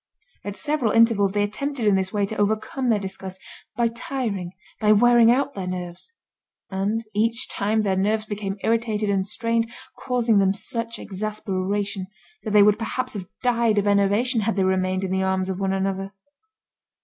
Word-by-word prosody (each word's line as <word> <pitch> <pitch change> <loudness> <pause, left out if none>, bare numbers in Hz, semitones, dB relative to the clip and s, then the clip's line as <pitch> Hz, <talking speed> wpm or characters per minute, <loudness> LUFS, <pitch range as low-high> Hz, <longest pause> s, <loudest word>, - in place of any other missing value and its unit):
At 205 -1 -5
several 295 -6 0
intervals 225 -4 +4
they 205 0 +2
attempted 250 +4 -3
in 205 - +4
this 190 -1 0
way 205 -1 +1
to 220 +2 -5
overcome 220 +5 -1
their 225 -3 +3
disgust, 190 -1 -6 0.4
by 235 -1 +3
tiring, 230 -6 -3 0.3
by 215 -1 +5
wearing 235 +1 +6
out 275 +3 +2
their 190 -6 -5
nerves. 180 - -6 0.6
And 205 +4 -1
each 230 +3 +2
time 215 +2 0
their 195 -2 +1
nerves 215 +3 0
became 205 -2 -4
irritated 220 -2 0
and 195 -1 +1
strained, 230 +3 -1 0.3
causing 235 -4 +1
them 195 0 +2
such 230 +2 -3
exasperation, 200 -1 -3 0.3
that 220 - -5
they 210 -1 +6
would 210 +1 +4
perhaps 255 +3 -2
have 190 -4 -6 0.2
died 235 -3 +2
of 205 - +2
enervation 205 +4 +2
had 215 0 0
they 195 - +1
remained 185 0 0
in 190 - -2
the 190 0 +1
arms 190 0 0
of 185 - -5
one 195 -1 0
another. 195 0 -2
210 Hz, 175 wpm, -23 LUFS, 195-230 Hz, 0.6 s, wearing